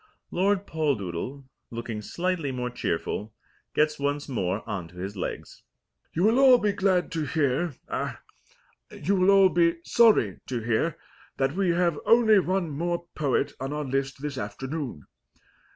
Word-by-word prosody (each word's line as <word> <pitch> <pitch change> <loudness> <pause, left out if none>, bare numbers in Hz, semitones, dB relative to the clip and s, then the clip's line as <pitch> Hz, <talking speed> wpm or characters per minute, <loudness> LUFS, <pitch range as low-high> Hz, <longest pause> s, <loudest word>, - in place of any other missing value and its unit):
Lord 195 +2 +1
Poldoodle, 135 - -2 0.2
looking 115 -2 -5
slightly 170 - -2
more 125 -1 -3
cheerful, 105 +1 -3 0.4
gets 150 0 +2
once 145 +1 -1
more 100 -6 -2
on 100 -6 -4
to 85 - -18
his 95 +3 -5
legs. 95 - -6 0.5
"You 170 - +1
will 225 +5 +4
all 265 -2 +8
be 210 -3 +1
very - - -9
glad 185 -2 +2
to 160 -2 -2
hear 145 +1 0
ah - - -3 0.7
you 200 - -1
will 185 0 +3
all 195 -1 +7
be 170 -1 +3
sorry 215 - +4
to 125 -2 -2
hear 115 +8 0 0.4
that 135 +1 +1
we 190 +1 +1
have 170 -2 +1
only 225 -3 +6
one 185 -3 -1
more 170 +4 -2
poet 145 -4 0
on 135 +2 -3
our 150 0 -3
list 135 +1 -2
this 145 -3 -3
afternoon. 125 - -5
150 Hz, 155 wpm, -26 LUFS, 125-180 Hz, 0.7 s, all